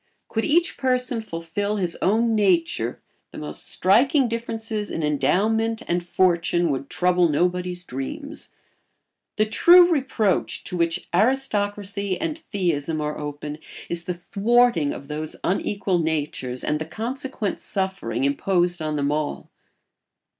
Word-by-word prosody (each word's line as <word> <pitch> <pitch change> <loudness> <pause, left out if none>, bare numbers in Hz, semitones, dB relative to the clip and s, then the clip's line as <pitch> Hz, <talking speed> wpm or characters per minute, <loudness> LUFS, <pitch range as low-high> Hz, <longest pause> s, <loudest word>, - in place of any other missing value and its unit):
Could 225 - -1
each 335 +3 +2
person 250 -3 0
fulfil 200 +2 -3
his 180 -4 -2
own 225 +4 +2
nature 170 - +1 0.3
the - - -11
most 75 0 -7
striking 250 - +3
differences 225 -2 -3
in 165 - -3
endowment 215 +11 +1
and 175 0 0
fortune 175 -2 +2
would 135 0 -3
trouble 180 -1 +2
nobody's 180 +3 0
dreams. 135 - -6 0.9
The 215 - +2
true 350 +10 +7
reproach 260 - 0
to - - -5
which 170 +1 0
aristocracy 205 -3 0
and 320 -1 -2
theism 165 - -1
are 150 0 -3
open 150 0 -6 0.3
is 170 0 -1
the 180 - -2
thwarting 200 -2 +2
of 140 - -8
those 155 +1 -4
unequal 195 0 0
natures 145 -6 -2
and 150 - 0
the 155 - -3
consequent 230 - -4
suffering 190 - -2
imposed 175 +5 +1
on 155 -1 -2
them 145 -1 0
all. 150 0 -3
180 Hz, 130 wpm, -23 LUFS, 155-225 Hz, 0.9 s, true